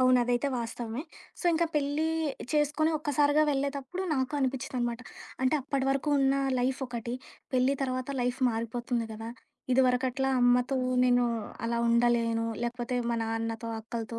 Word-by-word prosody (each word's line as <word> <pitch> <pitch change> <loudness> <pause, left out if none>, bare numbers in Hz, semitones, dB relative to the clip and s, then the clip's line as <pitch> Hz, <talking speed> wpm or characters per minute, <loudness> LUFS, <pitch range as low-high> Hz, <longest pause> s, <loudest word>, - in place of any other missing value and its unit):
అవును 255 0 +5
అదైతే 245 +3 +1
వాస్తవమే. 235 +2 -4 0.4
సో, - - -8
ఇంకా 335 +1 +2
పెళ్లి 290 +2 +1 0.5
చేసుకొని 300 +1 +2
ఒక్కసారిగా 290 0 +3
వెళ్ళేతప్పుడు 280 +5 -2
నాకు 260 +1 -1
అనిపించిందనమాట. 255 -3 -1 0.4
అంటే 260 +3 +3
అప్పటివరకు 270 +1 0
ఉన్న 270 0 +3 0.2
లైఫొకటి, 245 -2 -2 0.4
పెళ్లి 255 +2 +3
తర్వాత 255 0 -2
లైఫ్ 245 +1 0
మారిపోతుంది 235 +1 -2
గదా! 225 +1 -6 0.4
ఇదివరకట్లా 255 +1 +2
అమ్మతో 245 +2 +3 0.3
నేను 245 -1 +4 0.4
అలా 235 0 0
ఉండలేను. 230 -1 +2 0.2
లేకపోతే 240 +1 -2 0.2
మా 235 - 0
నాన్నతో, 225 0 -3
అక్కలతో, 230 0 -5
250 Hz, 125 wpm, -29 LUFS, 235-275 Hz, 0.5 s, అవును